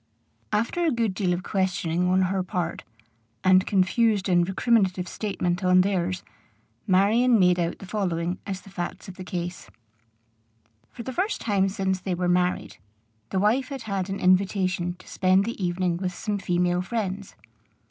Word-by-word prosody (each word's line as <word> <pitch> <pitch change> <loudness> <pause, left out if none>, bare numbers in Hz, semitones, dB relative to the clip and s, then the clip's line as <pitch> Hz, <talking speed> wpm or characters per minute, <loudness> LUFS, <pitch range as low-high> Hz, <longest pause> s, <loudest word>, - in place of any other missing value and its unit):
After 230 +11 0
a 335 - +3
good 230 -7 0
deal 185 -1 0
of 175 +1 -1
questioning 180 -3 0
on 185 +1 +3
her 190 +1 0
part, 180 -2 -3 0.6
and 185 0 +5
confused 205 +1 +2
and 175 -1 +3
recriminative 190 -3 +1
statement 180 -3 -2
on 185 0 +5
theirs, 185 -2 -1 0.6
Marion 220 +6 +4
made 180 -1 +4
out 170 0 -1
the - - -10
following 180 -3 -2
as 195 -1 -4
the 195 - -15
facts 175 -2 -5
of 190 - -8
the 185 - -8
case: 175 -1 -5 1.2
For 235 - -9
the 260 - -5
first 390 +8 -1
time 195 -3 +1
since 190 -2 -1
they 185 -1 -2
were 180 0 -1
married, 180 0 0 0.5
the - - -2
wife 225 +7 +2
had 270 -4 -6
had 195 -3 -3
an 195 - -3
invitation 185 -1 +1
to - - -19
spend 190 +1 +2
the 230 -3 -4
evening 175 -1 0
with 180 -1 -3
some 205 -2 -2
female 180 -1 +1
friends. 200 -1 -4
185 Hz, 165 wpm, -25 LUFS, 180-205 Hz, 1.2 s, and